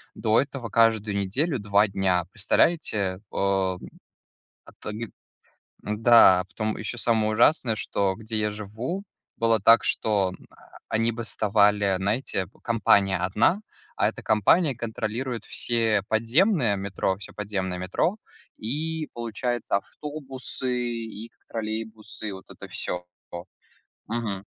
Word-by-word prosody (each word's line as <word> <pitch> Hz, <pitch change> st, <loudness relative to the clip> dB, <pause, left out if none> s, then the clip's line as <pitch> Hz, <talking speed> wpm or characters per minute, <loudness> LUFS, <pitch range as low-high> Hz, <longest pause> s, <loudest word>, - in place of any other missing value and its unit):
До 110 Hz, +1 st, +2 dB
этого 130 Hz, -3 st, -3 dB
каждую 110 Hz, -2 st, +3 dB
неделю 130 Hz, -, 0 dB
2 105 Hz, +1 st, +3 dB
дня, 95 Hz, -3 st, +1 dB
представляете, 105 Hz, -, +1 dB
э? -, -, -7 dB, 1.3 s
А -, -, -14 dB
тоги 105 Hz, +1 st, -5 dB, 0.7 s
да, 105 Hz, -4 st, +6 dB
потом 110 Hz, +1 st, -3 dB
ещё 110 Hz, +3 st, -4 dB
самое 110 Hz, -2 st, +2 dB
ужасное, 120 Hz, +1 st, +3 dB
что 100 Hz, -2 st, -1 dB
где 110 Hz, +2 st, -5 dB
я 105 Hz, 0 st, 0 dB
живу, 110 Hz, -, -5 dB, 0.3 s
было 115 Hz, -1 st, +3 dB
так, 115 Hz, +3 st, +6 dB
что 100 Hz, -4 st, +1 dB, 0.6 s
они 115 Hz, +1 st, +1 dB
бастовали, 105 Hz, -3 st, +2 dB
знаете, 100 Hz, -1 st, -1 dB, 0.2 s
компания 100 Hz, -4 st, +3 dB
одна, 100 Hz, -, +2 dB, 0.4 s
а -, -, +3 dB
эта -, -, -7 dB
компания 130 Hz, -, +3 dB
контролирует 115 Hz, +2 st, -4 dB
все 115 Hz, -4 st, +1 dB
подземные 120 Hz, -, +3 dB
метро 95 Hz, -1 st, -1 dB
всё 100 Hz, -, -10 dB
подземное 95 Hz, -3 st, -3 dB
метро, 95 Hz, -, 0 dB, 0.4 s
и 155 Hz, +7 st, -3 dB
получается, 120 Hz, -1 st, -2 dB
автобусы, 135 Hz, +1 st, -7 dB, 0.2 s
и 115 Hz, -1 st, -6 dB
к -, -, -41 dB
троллейбусы, 110 Hz, 0 st, -5 dB
и -, -, -4 dB
вот 95 Hz, 0 st, -9 dB
это -, -, -10 dB
всё, 90 Hz, 0 st, -4 dB, 0.3 s
о 85 Hz, 0 st, -6 dB, 0.6 s
Мгм. 105 Hz, -4 st, -3 dB
110 Hz, 120 wpm, -25 LUFS, 100-120 Hz, 1.3 s, да